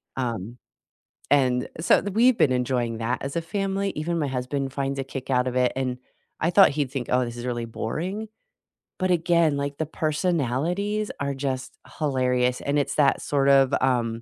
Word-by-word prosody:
Um, 120 -3 -3 0.7
and 130 -3 +3
so 160 - +4
we've 225 +5 +3
been 140 - +4
enjoying 120 -2 -1
that 120 +2 -1
as 135 0 -5
a 170 - 0
family, 195 +2 -2
even 165 +2 -2
my 145 - 0
husband 135 +1 -3
finds 140 0 -2
a 135 - -1
kick 135 0 -7
out 125 -1 +2
of 125 - -3
it, 125 -1 +2
and 130 -1 -2 0.4
I 160 - +1
thought 195 +2 +7
he'd 140 -3 -2
think, 135 -3 -4
"Oh, 125 0 +3
this 120 0 -7
is 120 - -6
really 120 -2 -2
boring." 180 - -4 0.7
but 185 -1 0
again, 170 -3 +3
like, 140 0 -3
the 160 - 0
personalities 170 - -1
are 140 0 -1
just 135 -1 -4 0.2
hilarious, 125 -4 +1
and 140 +1 0
it's 145 - 0
that, 140 -2 +3
sort 140 -1 +1
of, 135 -1 +5
um 120 -3 0
135 Hz, 180 wpm, -25 LUFS, 125-165 Hz, 0.7 s, thought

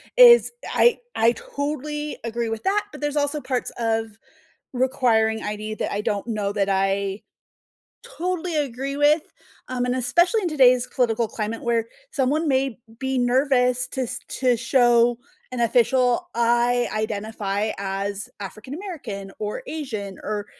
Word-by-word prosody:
is 485 -2 +8 0.2
I 480 - +4 0.2
I 230 +1 +4
totally 295 +2 -4
agree 230 0 -2
with 225 0 -4
that, 410 +2 +1
but - - -10
there's 295 0 -1
also 290 +1 0
parts 255 -3 -2
of 225 -2 -1 0.6
requiring 235 -4 +1
ID 210 +1 -4
that - - -3
I 205 - -1
don't 205 0 -2
know 210 -3 -2
that 200 -1 +1
I 195 +1 0 0.8
totally 355 -1 -3
agree 275 0 -2
with, 295 +2 +4 0.5
um, 250 -1 -1
and 250 - 0
especially 345 - +2
in 365 - -1
today's 255 -5 +4
political 235 -2 0
climate 220 +1 -4
where 230 -1 0 0.2
someone 295 - +1
may 265 -2 +1 0.2
be 265 0 -1
nervous 250 0 +2
to 265 - -3
s 250 0 -3 0.2
to 250 -2 +3
show 240 0 +3 0.3
an 250 - -3
official, 250 +7 +2
"I 240 +1 +2
identify 215 -1 -2
as 200 +1 -3
African 215 +6 -8
American, 275 - -6
or 210 0 -4
Asian," 220 -11 -5
or, 210 -1 -3
245 Hz, 145 wpm, -23 LUFS, 215-275 Hz, 0.8 s, is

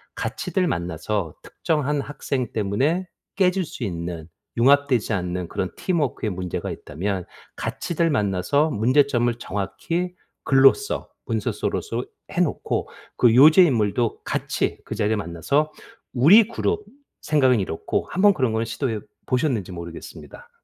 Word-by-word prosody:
같이들 185 -3 -1
만나서 85 +1 -2
특정한 150 -2 -1
학생 135 -4 -3
때문에 130 - 0 0.3
깨질 185 -1 +2
수 135 - -8
있는 85 -4 -4 0.3
융합되지 130 -3 +3
않는 90 -1 -2
그런 95 - -2
팀워크에 150 - -1
문제가 90 -2 -4
있다면 90 +4 -4 0.3
같이들 170 -1 -1
만나서 105 - +1
문제점을 125 +1 +3
정확히 165 - -3 0.3
글로서 135 - +3 0.2
문서로서 - - -2 0.3
해 180 - -3
놓고 165 - -1 0.3
그 120 -2 +5
요주의 155 +6 +8
인물도 115 -2 0
같이 - - -2
그 - - -5
자리에 105 +2 +1
만나서 120 - 0 0.4
우리 180 - +7
그룹 420 - -2 0.4
생각은 130 -6 +3
이렇고 95 -4 -2
한번 200 +2 +4
그런 130 -9 0
거는 110 +1 0
시도해 115 -1 -3 0.2
보셨는지 125 - 0
모르겠습니다. 85 -1 -10
125 Hz, 305 characters per minute, -23 LUFS, 100-155 Hz, 0.4 s, 요주의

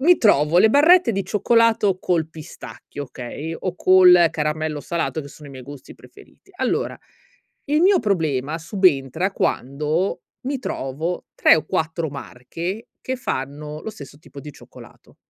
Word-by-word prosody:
mi 345 +6 +5
trovo 165 -6 +3
le 220 - +6
barrette 300 +2 +5
di 195 -1 -2
cioccolato 215 -1 +2
col 165 -4 -1
pistacchio, 155 -2 -10
okay, 140 +5 -7
o 185 -2 -4
col 180 -2 +6
caramello 150 0 -2
salato 165 0 -3
che 145 - -10
sono 145 +1 -13
i - - -12
miei 130 -1 -10
gusti 145 -1 -11
preferiti. - - -19
Allora - - -1 0.7
il 300 +2 +1
mio 385 +1 +5
problema 160 - -1
subentra 175 - +1
quando 150 +6 -1 0.2
mi 270 +2 -3
trovo 160 - -4
3 - - +5
o 155 - -3
4 160 +1 -2
marche 165 - -7
che 260 - -4
fanno 150 - -5
lo 220 - -5
stesso 145 -8 -12
tipo 145 -2 -13
di 150 +1 -10
cioccolato. - - -17
165 Hz, 150 wpm, -21 LUFS, 145-200 Hz, 0.7 s, le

